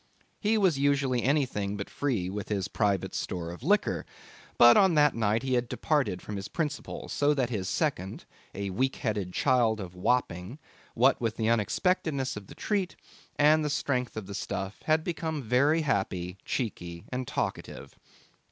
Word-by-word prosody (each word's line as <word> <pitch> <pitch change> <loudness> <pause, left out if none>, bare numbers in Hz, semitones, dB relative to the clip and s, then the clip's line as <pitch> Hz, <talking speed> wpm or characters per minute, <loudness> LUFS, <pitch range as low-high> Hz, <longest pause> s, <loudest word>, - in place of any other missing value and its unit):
He 220 +1 +2
was 185 -9 +3
usually 140 -3 +2
anything 125 -8 0
but 100 - -5
free 120 -11 -1
with 100 +2 -5
his 100 -3 -1
private 100 -4 0
store 85 -2 -3
of 85 - -10
liquor; 205 - +1 0.5
but 120 0 +8
on 190 -4 +5
that 150 -1 +5
night 110 +1 +1
he 130 -1 -1
had 120 -1 +1
departed 125 - 0
from 105 - -5
his 95 - -5
principles, 150 -3 -4
so 145 +1 +2
that 125 -3 0
his 95 -5 -2
second, 95 +2 -2 0.3
a 100 -1 -3
weak 130 +8 0
headed 105 -5 -2
child 120 -1 +2
of 90 -3 -7
Wapping, 90 +2 -1 0.4
what 130 +3 +4
with 115 -2 -1
the 110 -1 +1
unexpectedness 135 - +1
of 105 -2 -8
the - - -12
treat 195 -4 -1 0.4
and 155 +1 +5
the 150 - 0
strength 125 -5 -1
of 110 - -4
the 100 - -8
stuff, 95 0 -4
had 155 0 +3
become 160 -4 -3
very 140 +8 +3
happy, 95 -8 -1
cheeky, 85 -8 -4
and 130 -1 -3
talkative. - - -4
120 Hz, 170 wpm, -28 LUFS, 100-145 Hz, 0.5 s, but